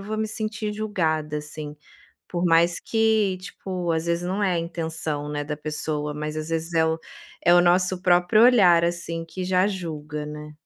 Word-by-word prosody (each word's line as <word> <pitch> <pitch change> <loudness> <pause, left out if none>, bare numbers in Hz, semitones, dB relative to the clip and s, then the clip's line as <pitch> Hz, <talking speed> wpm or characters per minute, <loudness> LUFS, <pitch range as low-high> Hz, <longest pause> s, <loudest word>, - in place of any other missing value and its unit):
vou 215 +2 -4
me 220 - 0
sentir 215 -1 -3
julgada, 160 -8 -1
assim, 150 0 -7 0.5
por 175 0 -2
mais 170 +1 +3
que 220 -4 +1
tipo, 180 -2 -4
às 160 +1 -1
vezes 170 +1 0
não 190 +3 -2
é 185 -2 +2
a 170 - 0
intenção, 160 -3 -3
né, 145 0 -3
da 150 0 -5
pessoa, 150 0 -3
mas 150 +1 -4
às 155 +1 -4
vezes 165 +1 -2
é 160 0 +4
o 160 0 0 0.4
é 175 - +5
o - - +7
nosso 180 +1 +3
próprio 180 +5 +4
olhar, 185 -9 +6
assim, 170 -1 -2
que 185 +2 -6
já 185 +1 +2
julga, 155 -6 -5
né? 150 0 -8
170 Hz, 185 wpm, -24 LUFS, 155-185 Hz, 0.5 s, o